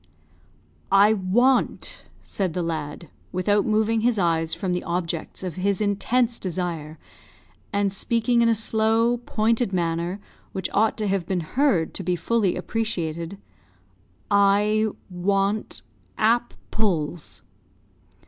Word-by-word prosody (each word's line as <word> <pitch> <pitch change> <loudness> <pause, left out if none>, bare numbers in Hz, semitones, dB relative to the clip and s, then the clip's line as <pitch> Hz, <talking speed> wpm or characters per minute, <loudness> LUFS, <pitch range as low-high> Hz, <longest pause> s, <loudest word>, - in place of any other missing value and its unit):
"I 200 +2 +6
want," 235 +7 +1 0.2
said 190 -5 -2
the 180 - -1
lad, 160 -1 -4 0.2
without 200 +3 +1
moving 220 +1 +2
his 235 0 +2
eyes 165 -3 +1
from 185 0 -2
the 180 - -2
objects 170 0 -3
of 180 -3 -5
his 195 +1 0
intense 225 +4 +1
desire, 170 -4 -4 0.7
and 200 -1 0
speaking 235 +3 +1
in 230 - +4
a 230 - +3
slow, 225 +2 +2
pointed 225 0 +1
manner, 170 +2 -1 0.3
which 190 -2 -2
ought 220 +2 +2
to 215 -2 -1
have 190 -3 -1
been 185 -2 0
heard 185 - +1
to - - -6
be 180 0 0
fully 200 +2 +1
appreciated, 170 -5 -3 0.9
"I 205 +2 +4 0.2
want 195 +3 -1 0.3
ap 235 +2 +2 0.2
ples!" 175 -7 -2
200 Hz, 120 wpm, -24 LUFS, 175-220 Hz, 0.9 s, I